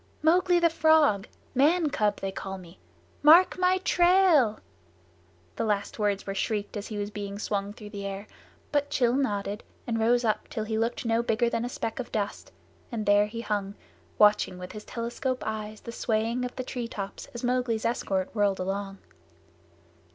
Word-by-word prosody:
"Mowgli, 355 Hz, +2 st, +4 dB
the 340 Hz, -1 st, +3 dB
Frog. 310 Hz, -11 st, +4 dB, 0.3 s
Man 300 Hz, +4 st, +3 dB
cub 210 Hz, -6 st, 0 dB
they 195 Hz, -, -2 dB
call 195 Hz, 0 st, -6 dB
me! 180 Hz, -1 st, -14 dB, 0.4 s
Mark 335 Hz, +5 st, +7 dB
my 365 Hz, 0 st, +4 dB
trail!" 350 Hz, -, +4 dB, 1.0 s
The -, -, 0 dB
last 205 Hz, -1 st, -1 dB
words 205 Hz, -2 st, 0 dB
were 195 Hz, -, -3 dB
shrieked 205 Hz, +1 st, -2 dB
as 205 Hz, 0 st, -4 dB
he 215 Hz, -, -5 dB
was 205 Hz, 0 st, -3 dB
being 200 Hz, -1 st, -5 dB
swung 205 Hz, -1 st, -2 dB
through 210 Hz, -1 st, -11 dB
the 200 Hz, -2 st, -5 dB
air, 195 Hz, +1 st, -6 dB, 0.5 s
but 290 Hz, 0 st, 0 dB
Rann 250 Hz, +2 st, +3 dB
nodded 205 Hz, -4 st, -2 dB, 0.2 s
and 225 Hz, -1 st, -1 dB
rose 240 Hz, +2 st, +3 dB
up 215 Hz, -, 0 dB
till 220 Hz, -, -4 dB
he 220 Hz, 0 st, -3 dB
looked 230 Hz, +2 st, -1 dB
no 230 Hz, 0 st, +2 dB
bigger 235 Hz, 0 st, +1 dB
than 230 Hz, -, -1 dB
a 245 Hz, -, -3 dB
speck 225 Hz, 0 st, -4 dB
of 250 Hz, -, -5 dB
dust, 205 Hz, -2 st, -3 dB, 0.4 s
and 220 Hz, -3 st, -3 dB
there 205 Hz, +1 st, +4 dB
he 230 Hz, +2 st, -6 dB
hung, 205 Hz, -3 st, -2 dB, 0.4 s
watching 210 Hz, -3 st, +4 dB
with 180 Hz, 0 st, -8 dB
his 210 Hz, -1 st, -9 dB
telescope 240 Hz, +2 st, -3 dB
eyes 215 Hz, 0 st, -5 dB
the 235 Hz, -, -7 dB
swaying 230 Hz, +2 st, -1 dB
of 250 Hz, -, -6 dB
the 255 Hz, -, -3 dB
treetops 230 Hz, -6 st, -5 dB
as 235 Hz, -, -6 dB
Mowgli's 245 Hz, -3 st, 0 dB
escort 195 Hz, -5 st, -1 dB
whirled 205 Hz, -3 st, +2 dB
along. 195 Hz, +1 st, -3 dB
220 Hz, 175 wpm, -27 LUFS, 205-250 Hz, 1.0 s, Mark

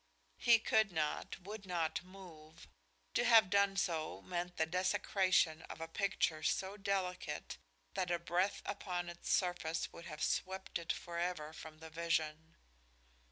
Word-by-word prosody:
He 235 Hz, -1 st, +7 dB
could 220 Hz, -2 st, +3 dB
not, 155 Hz, -3 st, -1 dB
would 205 Hz, +3 st, -7 dB
not 170 Hz, -3 st, 0 dB
move. 175 Hz, -4 st, -13 dB, 0.5 s
To -, -, +3 dB
have 225 Hz, -6 st, +7 dB
done 200 Hz, -1 st, +4 dB
so 165 Hz, -6 st, -1 dB
meant 180 Hz, 0 st, -3 dB
the 160 Hz, -, +3 dB
desecration 185 Hz, -2 st, +2 dB
of -, -, -7 dB
a 165 Hz, -, -4 dB
picture 165 Hz, -3 st, 0 dB
so 190 Hz, +5 st, 0 dB
delicate 190 Hz, -, -2 dB, 0.3 s
that 180 Hz, -, -1 dB
a 175 Hz, -, +2 dB
breath 175 Hz, +3 st, 0 dB
upon 180 Hz, -3 st, -3 dB
its 170 Hz, 0 st, -7 dB
surface 175 Hz, -3 st, 0 dB
would 170 Hz, -, -10 dB
have 155 Hz, -, -5 dB
swept 190 Hz, -1 st, -1 dB
it 170 Hz, -, -2 dB
forever 170 Hz, -2 st, -3 dB
from 155 Hz, 0 st, -9 dB
the 160 Hz, 0 st, -10 dB
vision. 160 Hz, -1 st, -1 dB
175 Hz, 145 wpm, -36 LUFS, 160-190 Hz, 0.5 s, He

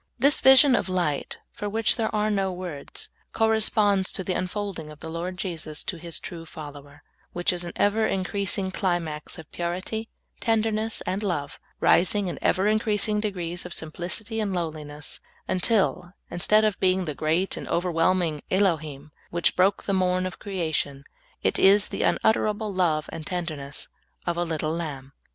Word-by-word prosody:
This 280 Hz, +5 st, +4 dB
vision 265 Hz, 0 st, +8 dB
of 195 Hz, -, -1 dB
light, 175 Hz, -6 st, -1 dB
for 205 Hz, -, -4 dB
wdiich 220 Hz, +1 st, +2 dB
there 225 Hz, -2 st, -1 dB
are 215 Hz, 0 st, +1 dB
no 195 Hz, -2 st, +1 dB
words, 175 Hz, -6 st, -4 dB, 0.2 s
corresponds 215 Hz, -3 st, +3 dB
to 190 Hz, -, -1 dB
the 185 Hz, -, -1 dB
unfolding 185 Hz, -3 st, -3 dB
of 150 Hz, -1 st, -12 dB
the 160 Hz, -, -7 dB
Lord 175 Hz, +2 st, -4 dB
Jesus 160 Hz, -5 st, -5 dB
to 180 Hz, -, -3 dB
His 170 Hz, 0 st, -4 dB
true 170 Hz, -2 st, -7 dB
follower, 145 Hz, -2 st, -10 dB, 0.3 s
which 175 Hz, +1 st, +1 dB
is 175 Hz, 0 st, -1 dB
an 170 Hz, -, -6 dB
ever 220 Hz, +2 st, +2 dB
increasing 195 Hz, 0 st, 0 dB
climax 175 Hz, -6 st, -2 dB
of 160 Hz, -, -11 dB
purit}^ 185 Hz, +6 st, -3 dB, 0.3 s
tenderness, 225 Hz, -1 st, 0 dB
and 185 Hz, +3 st, -2 dB
love, 170 Hz, -9 st, -2 dB, 0.2 s
rising 200 Hz, +3 st, +4 dB
in 170 Hz, -5 st, -4 dB
ever 190 Hz, -, +2 dB
increasing 215 Hz, -1 st, +1 dB
degrees 180 Hz, -5 st, -3 dB
of 180 Hz, -, -7 dB
simplicity 185 Hz, +8 st, -3 dB
and 200 Hz, -3 st, -1 dB
lowliness, 155 Hz, -3 st, -5 dB, 0.3 s
until, 185 Hz, -2 st, +1 dB, 0.2 s
instead 215 Hz, +5 st, +4 dB
of 210 Hz, -2 st, 0 dB
being 185 Hz, 0 st, +2 dB
the 155 Hz, -, -3 dB
great 160 Hz, +6 st, 0 dB
and -, -, -6 dB
overwhelming 170 Hz, -2 st, +1 dB
Elohwi 155 Hz, -7 st, +1 dB, 0.2 s
which 170 Hz, 0 st, +1 dB
broke 190 Hz, +2 st, +3 dB
the 200 Hz, -, -1 dB
morn 185 Hz, -1 st, +2 dB
of 185 Hz, -, -5 dB
creation, 160 Hz, -8 st, -2 dB, 0.4 s
it -, -, +1 dB
is 200 Hz, +2 st, +6 dB
the -, -, -3 dB
unutteral^le 215 Hz, -2 st, +1 dB
love 160 Hz, -5 st, +2 dB
and 160 Hz, -1 st, -7 dB
tenderness 155 Hz, -6 st, -4 dB, 0.4 s
of 175 Hz, -, 0 dB
a 175 Hz, -, 0 dB
little 160 Hz, -2 st, -2 dB
lamb. 140 Hz, -5 st, -5 dB
180 Hz, 160 wpm, -26 LUFS, 160-205 Hz, 0.4 s, vision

